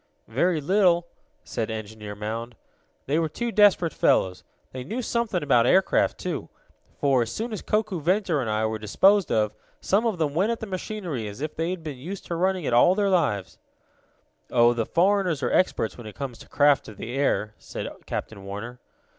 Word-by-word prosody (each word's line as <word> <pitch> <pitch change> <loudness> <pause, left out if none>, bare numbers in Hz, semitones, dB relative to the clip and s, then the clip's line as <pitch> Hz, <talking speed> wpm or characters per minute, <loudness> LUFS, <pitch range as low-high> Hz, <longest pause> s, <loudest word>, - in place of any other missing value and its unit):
"Very 160 +8 +1
little," 175 +1 +3 0.4
said 115 -1 -3
Engineer 110 -1 -6
Mound. 115 +3 -5 0.5
"They 150 +4 +1
were 160 -1 0
desperate 205 -5 +3
fellows. 90 -1 +2 0.3
They 130 -1 -6
know 215 - -4
something 235 -7 -1
about 125 -5 +4
aircraft, 190 +5 +3
too. 160 - -4 0.5
For, 135 -3 +3
as 115 -1 -2
soon 225 - -4
as 215 - -4
Koku, 210 -5 -1
Ventor 175 -2 +1
and 115 - -3
I 110 +1 +1
were 110 0 -2
disposed 190 - +3
of, 105 -1 +1 0.3
some 210 +5 +1
of 215 -5 -1
them 155 -3 0
went 190 +8 +2
at 230 - -3
the - - -5
machinery 185 - -4
as 105 +2 -8
if 150 +1 -4
they 165 +2 -1
had 185 -2 -4
been 145 -5 -6
used 180 +8 -7
to 170 - -3
running 185 +1 0
it 125 - -1
all 175 +10 +6
their 200 -1 +1
lives." 115 - 0 0.9
"Oh, 120 -1 +5
the 115 -2 -2
foreigners 180 -4 +2
are - - 0
experts 125 -10 +1
when 115 - -8
it 105 - -10
comes 125 -2 -6
to - - -14
craft 145 -1 +3
of 105 - -11
the 120 - -6
air," 120 -6 0
said - - -6 0.2
Captain 100 -3 -5
Warner. 105 +5 -7
150 Hz, 190 wpm, -25 LUFS, 115-190 Hz, 0.9 s, all